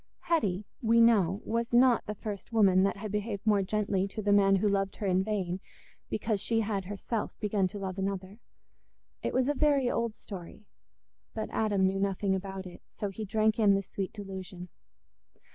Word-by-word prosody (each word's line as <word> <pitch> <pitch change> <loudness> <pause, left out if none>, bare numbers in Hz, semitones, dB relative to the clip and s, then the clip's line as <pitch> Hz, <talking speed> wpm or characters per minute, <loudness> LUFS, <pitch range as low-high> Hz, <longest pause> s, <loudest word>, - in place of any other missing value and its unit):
Hetty, 210 - 0 0.2
we 230 0 +4
know, 205 -4 +4
was 230 +1 -1
not 245 0 +4
the 210 - -3
first 205 0 -6
woman 195 -5 +5
that 195 +1 +1
had 210 0 -5
behaved 210 0 -3
more 210 -2 +4
gently 200 -1 0
to 215 +2 -6
the 205 0 +3
man 195 -1 +5
who 195 +2 +2
loved 195 -1 0
her 210 - -5
in 185 0 +2
vain 190 -4 -2 0.5
because 215 -1 -1
she 225 -1 +1
had 205 -3 -2
herself 205 +3 -4
begun 205 -3 +1
to 200 +3 -8
love 190 -1 -4
another. 195 +1 -3 0.8
It - - -1
was 255 0 +1
a 290 - +2
very 280 -3 +2
old 230 -2 -1
story, 195 +1 -10 0.7
but 220 -1 -4
Adam 205 -3 +1
knew 190 +1 +1
nothing 195 0 0
about 190 0 -4
it, 180 - -11
so 205 - -4
he 215 +3 -5
drank 215 +2 +1
in 205 -3 +5
the 195 - 0
sweet 195 0 -4
delusion. 190 -3 -8
200 Hz, 185 wpm, -30 LUFS, 195-220 Hz, 0.8 s, woman